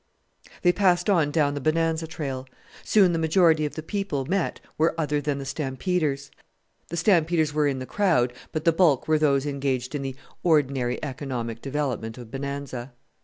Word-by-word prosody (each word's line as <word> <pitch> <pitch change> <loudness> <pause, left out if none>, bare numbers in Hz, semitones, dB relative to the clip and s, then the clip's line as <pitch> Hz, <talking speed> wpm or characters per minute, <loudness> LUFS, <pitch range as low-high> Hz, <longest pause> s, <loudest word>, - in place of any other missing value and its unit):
They 175 - +6
passed 180 0 +2
on 165 -6 +3
down 145 -2 +2
the 145 - -4
Bonanza 160 +2 +1
trail; 135 -5 -5 0.4
soon 190 -5 +4
the 165 - 0
majority 160 -1 +4
of - - -10
the 155 - -5
people 180 -7 -2
met 185 +3 -1 0.2
were 165 +1 +1
other 150 -2 0
than 145 -1 -1
the 140 - -5
stampeders. 140 +1 -2 0.6
The 170 - -5
stampeders 165 -4 +2
were 150 -1 +2
in 140 -2 0
the 130 - -5
crowd, 160 -10 +2 0.2
but 155 -1 -3
the 165 - +5
bulk 160 -6 +3
were 155 -1 +3
those 140 -2 +2
engaged 135 -3 -2
in 145 - -2
the 135 -1 -4 0.3
ordinary 140 -7 +2
economic 130 -5 -4
development 135 -5 -3
of 120 -3 -10
Bonanza. 135 -2 -5
150 Hz, 170 wpm, -25 LUFS, 135-165 Hz, 0.6 s, They